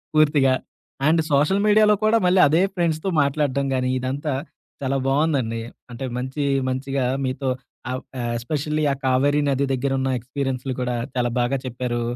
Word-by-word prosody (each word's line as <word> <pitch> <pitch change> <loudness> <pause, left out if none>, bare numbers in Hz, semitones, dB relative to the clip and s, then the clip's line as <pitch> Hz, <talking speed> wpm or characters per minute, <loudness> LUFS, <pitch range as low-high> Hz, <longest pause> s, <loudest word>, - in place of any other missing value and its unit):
పూర్తిగా. 145 -3 +4 0.5
And 160 +1 +4
social 150 +8 +3
మీడియాలో 210 0 +5
కూడా 220 +1 +4
మళ్ళీ 180 +1 +4
అదే 160 +5 +3
ఫ్రెండ్స్‌తో 170 0 0
మాట్లాడడం 140 -1 0
గానీ, 130 0 0
ఇదంతా 135 +3 -2 0.5
చాలా 135 +1 0
బావుందండి. 135 -6 +1 0.3
అంటే 120 +3 -5
మంచి 130 +3 -3 0.3
మంచిగా 135 0 -1 0.2
మీతో 130 +1 -2 0.4
అవ్ 130 +1 -3 0.2
ఆహ్, 120 -1 -2
ఎస్పెషల్లీ 150 +5 -2
ఆ - - -4
కావేరి 140 +3 +3
నది 140 +1 +1
దగ్గర 135 +1 -1
ఉన్న 135 0 0
ఎక్స్‌పీరియన్సులు 130 +1 -3
కూడా 125 -1 -1 0.2
చాలా 120 -1 +1
బాగా 130 +2 0
చెప్పారు. 125 -1 -3
135 Hz, 150 wpm, -23 LUFS, 130-150 Hz, 0.5 s, మీడియాలో